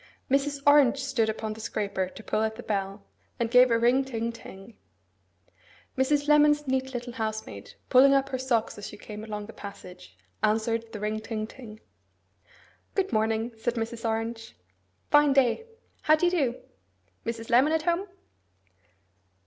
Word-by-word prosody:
Mrs. 280 0 +1
Orange 285 -3 +6
stood 265 -5 0
upon 220 0 -3
the 220 - -12
scraper 200 -3 -2
to 220 - -12
pull 215 - -1
at 220 0 -1
the 245 - -9
bell, 200 -1 -3 0.4
and 235 -1 -1
give 250 0 +7
a 230 - +3
ring 245 +3 +3
ting 235 -3 -3
ting. 220 -2 -12 1.2
Mrs. 285 +2 +1
Lemon's 295 -1 +4
neat 265 0 -1
little 245 0 -5
housemaid, 220 -2 -5
pulling 270 +2 +6
up 275 0 +2
her 260 - -3
socks 235 -5 -1
as 205 - -6
she 210 - -10
came 210 0 -9
along 210 -1 -5
the 225 - -11
passage, 180 - -11 0.2
answered 225 +1 0
the 215 - -7
ring 215 +1 -2
ting 215 -1 -4
ting. 220 -2 -12 1.1
'Good 390 -6 0
morning,' 220 +2 0
said 240 +2 -1
Mrs. 230 0 -4
Orange. 225 0 -3 0.6
'Fine 295 -1 +5
day. 270 - +2 0.3
How 310 - +5
do 315 - 0
you 350 - +3
do? 275 -9 0 0.6
Mrs. 230 0 -5
Lemon 260 +6 +5
at 320 -1 +1
home! 345 +4 0
235 Hz, 160 wpm, -27 LUFS, 220-270 Hz, 1.2 s, give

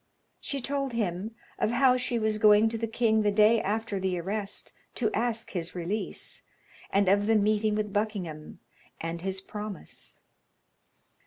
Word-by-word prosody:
She 280 -1 -3
told 275 0 -2
him 210 0 -2 0.2
of - - +2
how 250 +2 +4
she 250 -1 0
was 215 -1 0
going 210 +1 +6
to 225 - -3
the 230 - -1
king 220 -1 +2
the 205 -1 +2
day 215 +2 +5
after 215 0 -2
the 185 -1 -1
arrest 200 +3 -4 0.2
to 220 -4 +1
ask 230 0 -1
his 175 -1 -4
release, 180 +5 -2 0.5
and 200 0 +2
of 200 +2 +3
the 225 - +4
meeting 215 0 +2
with 210 -1 -2
Buckingham, 190 -8 -3 0.4
and 165 +1 -4
his 190 +1 -3
promise. 210 -2 -8
215 Hz, 155 wpm, -28 LUFS, 195-225 Hz, 0.5 s, going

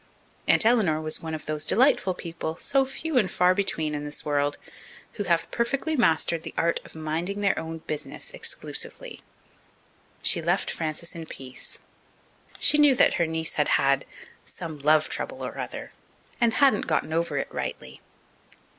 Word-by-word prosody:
Aunt - - +5
Eleanor 215 -10 +3
was 155 0 -4
one 160 -1 -4
of 155 - -8
those 155 0 -2
delightful 230 -6 +4
people, 165 -2 -5
so 270 +8 +1
few 270 +1 0
and 195 -5 +1
far 180 +1 +3
between 160 -6 -1
in 145 0 -3
this 145 0 -5
world, 145 -1 0 0.6
who 205 - -4
have 170 -2 +1
perfectly 275 +6 0
mastered 165 - +2
the - - -8
art 170 0 +2
of - - -15
minding 165 +6 -3
their 200 -1 +2
own 160 0 -6
business 150 -1 -5
exclusively. - - -2 1.0
She - - +4
left 175 +4 0
Frances 160 +1 -3
in 165 -1 -8
peace. 130 -3 -5 0.8
She 300 - +4
knew 290 -3 +6
that - - +5
her 170 - +3
niece 160 0 -1
had - - +1
had 140 0 +2 0.4
"some 160 -3 -7
love 155 +2 +4
trouble - - -4
or - - -6
other," - - -5 0.5
and 230 -1 +3
hadn't 270 -7 +4
gotten 160 - 0
over 165 -3 0
it - - -3
rightly. 65 +1 -5
165 Hz, 165 wpm, -26 LUFS, 155-205 Hz, 1.0 s, knew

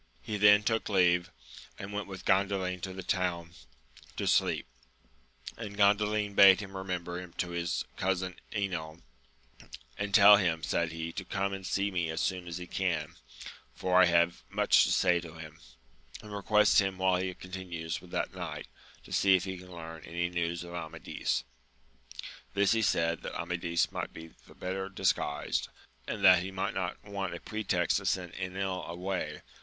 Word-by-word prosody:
He 105 - -3
then 105 0 +6
took 110 +1 0
leave, 90 -2 +3 0.5
and 100 +2 -7
went 105 0 -3
with 95 -2 -9
Gandalin 95 -2 +1
to 95 - -4
the 95 0 -7
town 85 -2 -1 0.7
to - - -2
sleep; - - +2 0.9
and 105 -3 -7
Gandalin 105 0 +2
bade 100 -1 +8
him 100 -2 -8
remember 90 -2 -4
him 90 -2 -11
to 90 -1 -3
his 85 0 -2
cousin 95 -1 -1
Enil, 85 -6 -3 1.0
And 100 0 -2
tell 100 0 +9
him, 85 -5 0
said 80 +3 0
he, 80 0 -5
to 95 - -4
come 100 +1 -2
and 95 -1 -5
see 100 +1 0
me 85 -3 -1
as 80 0 -3
soon 90 -1 -1
as 85 0 -5
he 90 - -6
can, 90 -3 -2 0.6
for 90 0 +3
I - - +8
have 85 0 +2
much - - +4
to - - -1
say 90 -2 +3
to 85 -1 -10
him, 80 0 -10 0.6
and 105 -1 -9
request 105 +1 +4
him 95 -1 -2
while 95 -1 +2
he 95 0 -2
continues 90 -3 -6
with 90 - -14
that - - -2
knight, - - -6 0.4
to - - -10
see 95 -1 +5
if 90 - +1
he 95 -2 -5
can 90 0 -13
learn 80 -2 -9
any 85 +1 -2
news 85 0 -2
of 85 0 -9
Amadis. 80 -7 -3 1.1
This 100 -1 +3
he 115 - +3
said 85 -5 +1
that - - -6
Amadis 85 -1 -1
might - - -4
be 80 0 -10 0.2
the - - -16
better 95 +1 -4
disguised, 75 -7 0 0.4
and 100 -3 -1
that 90 -2 +8
he 95 - -4
might 95 0 -2
not 90 -2 -3
want 100 -3 -4
a - - -7
pretext 95 -5 0
to 95 -1 -4
send 90 -1 -1
£nil 95 0 -3
away. 90 +2 -4
90 Hz, 175 wpm, -30 LUFS, 85-100 Hz, 1.1 s, tell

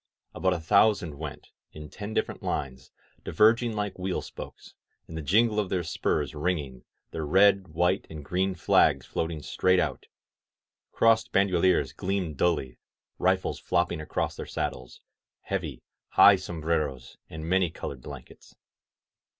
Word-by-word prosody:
About 95 -1 +1
a 90 - -2
thousand 90 -3 +2
went, 75 -2 -7 0.2
in 75 -1 -9
ten 100 +7 -7
different - - -2
lines, 65 -2 -4 0.3
diverg 110 +3 +4
ing 120 -2 -2
like 105 -3 -3
wheel 90 0 -2
spokes; - - -10 0.3
the 80 -1 -6
jingle 105 +7 +3
of 100 -3 -1
their 90 -2 -1
spurs 85 - -1
ringing, 75 -6 -3 0.3
their 80 - -4
red 95 +4 +4
white 90 +4 0
and 75 -3 -9
green 95 +3 0
flags 85 - +3
floating 80 -2 -3
straight 95 +6 +2
out, 75 -7 -2 0.8
crossed 115 -1 +3
bandoliers 95 -2 +2
gleaming 95 -4 -2
dully, 65 -5 -1 0.4
rifles - - +1
flopping 85 -2 0
across 80 - -2
their - - -7
saddles, 60 0 -5 0.4
heavy, - - -4 0.3
high 100 - +8
sombreros 80 -8 -3
and 80 0 -7
many 95 0 +2
colored 70 -4 -7
blankets. - - -12
85 Hz, 135 wpm, -27 LUFS, 75-95 Hz, 0.8 s, high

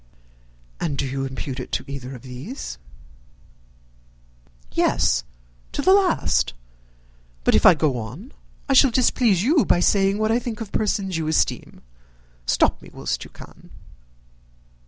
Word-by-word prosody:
"And 145 -3 -2
do - - -1
you 135 +1 -3
impute 130 0 -5
it 125 - -7
to - - -1
either 135 -1 -7
of 125 - -12
those?" 130 - -7 1.9
"Yes; 60 - +2 0.5
to 285 - -2
the 375 - +6
last. 380 - +2 0.9
But - - +3
if - - +5
I 180 - +8
go 145 -6 0
on 135 - -8 0.4
I 275 - +2
shall 270 0 +6
displease 235 -5 +2
you 295 +5 +4
by 175 - +2
saying 195 +2 +2
what 215 +1 +1
I 235 - +3
think 235 -2 -6
of 225 -3 -7
persons 195 -4 -1
you 160 -1 -2
esteem. 155 - -1 0.7
Stop - - +2
me, - - -13
whilst - - -3
you - - -12
can." - - -15
185 Hz, 145 wpm, -23 LUFS, -, 1.9 s, I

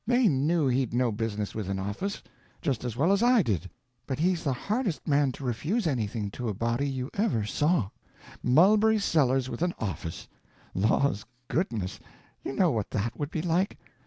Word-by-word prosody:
They 245 -1 +4
knew 150 0 +2
he'd 125 -2 +1
no 125 -1 +2
business 105 -1 -3
with 105 -4 -4
an 95 - -1
office, 105 - -3 0.4
just 135 -8 -1
as 120 -2 -4
well 165 +8 +3
as 200 - +3
I 240 -3 +5
did, 95 - -1 0.4
but 130 - -2
he's 175 +1 +1
the 140 - +1
hardest 205 - -2
man 140 -2 +3
to 140 - -9
refuse 150 - -1
anything 110 -7 -1
to 120 +1 -4
a 105 - -3
body 125 +4 -1
ever 195 - +1
saw. 145 - +1 0.5
Mulberry 210 - +5
Sellers 135 -9 +2
with 130 - -6
an 175 0 0
office! 85 -5 -5 0.5
laws 110 +2 +1 0.2
goodness, 115 - -1 0.4
you - - -3
know 175 +2 +3
what 110 -5 -2
that 110 +2 -2
would 145 -1 -2
be 160 - -3
like. 180 +3 +1
135 Hz, 175 wpm, -28 LUFS, 110-175 Hz, 0.5 s, I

